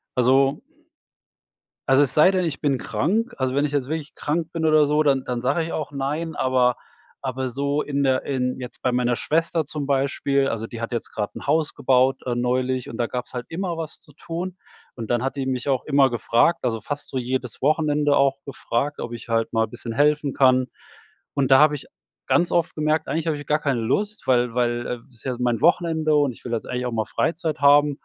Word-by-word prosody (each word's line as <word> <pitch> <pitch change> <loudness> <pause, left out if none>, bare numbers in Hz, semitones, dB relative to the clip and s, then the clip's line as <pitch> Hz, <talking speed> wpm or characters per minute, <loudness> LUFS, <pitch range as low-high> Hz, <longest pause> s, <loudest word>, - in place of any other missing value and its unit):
also 135 - +3 1.3
also 135 +2 +5
es 130 - -2
sei 155 +5 +6
denn, 185 -1 0
ich 150 - -3
bin 140 -4 +1
krank. 225 - -1
Also, 130 -1 -1
wenn 145 +1 +2
ich 145 - -6
jetzt 140 -3 -1
wirklich 155 -1 -4
krank 160 +2 -2
bin 165 -1 -2
oder 155 -1 +5
so, 150 +1 +2
dann 135 -3 +2
dann 125 -1 -3
sage 140 +6 +1
ich 165 - -5
auch 150 -2 -4
„Nein“, 150 +4 -3
aber 125 -2 +2 0.4
aber 130 -1 -3
so 140 +4 -1
in 140 -1 -2
der 130 -1 +2
in 125 -2 -1
jetzt 125 -2 -8
bei 125 - +2
meiner 125 -1 +1
Schwester 165 +2 0
zum 145 -1 -4
Beispiel, 140 0 +1
also, 115 0 -3
die 115 0 -8
hat 115 - -4
jetzt 120 - -3
gerade 105 -1 -3
'n - - -10
Haus 155 +1 +1
gebaut 130 +1 +2
äh, 120 - 0
neulich 125 +1 -1
und 115 - -7
da 120 - 0
gab's 125 +2 -6
halt 125 - -4
immer 175 0 -3
was 165 -2 -6
zu 150 - -19
tun 175 +4 -5 0.4
und 115 -3 -7
dann 120 -1 +1
hat 135 +2 -2
die 135 - -2
mich 130 +1 -2
auch 135 -2 +1
immer 140 -2 +4
gefragt 120 - +2
also 115 -3 -1
fast 145 +6 -5
so 130 - -2
jedes 125 -1 -3
Wochenende 150 0 +2
auch 135 0 +3
gefragt, 140 +1 -2
ob 120 - -5
ich 120 - -8
halt 115 0 0
mal 110 -1 +2
bisschen 120 -1 -7
helfen 145 +2 +2
kann 130 -1 +3 0.7
und 140 -2 0
da 135 - +8
habe 150 0 +5
ich 140 - -10 0.4
ganz 175 0 +2
oft 170 -2 +1
gemerkt, 155 +1 0
eigentlich 165 +1 -2
hab 155 - +1
ich 145 0 -7
gar 150 +1 +2
keine 140 -5 0
Lust, 205 - -2
weil 125 -2 +2
weil 120 0 -1
ist 115 - -12
ja 130 -2 -2
mein 120 -2 0
Wochenende 160 -2 +2
und 145 -3 +2
ich - - -18
will 120 - -5
jetzt 115 - -2
eigentlich 125 0 -2
auch 125 - -3
mal 110 -1 0
Freizeit 160 +4 -1
haben 145 +1 +6
135 Hz, 220 wpm, -23 LUFS, 125-150 Hz, 1.3 s, da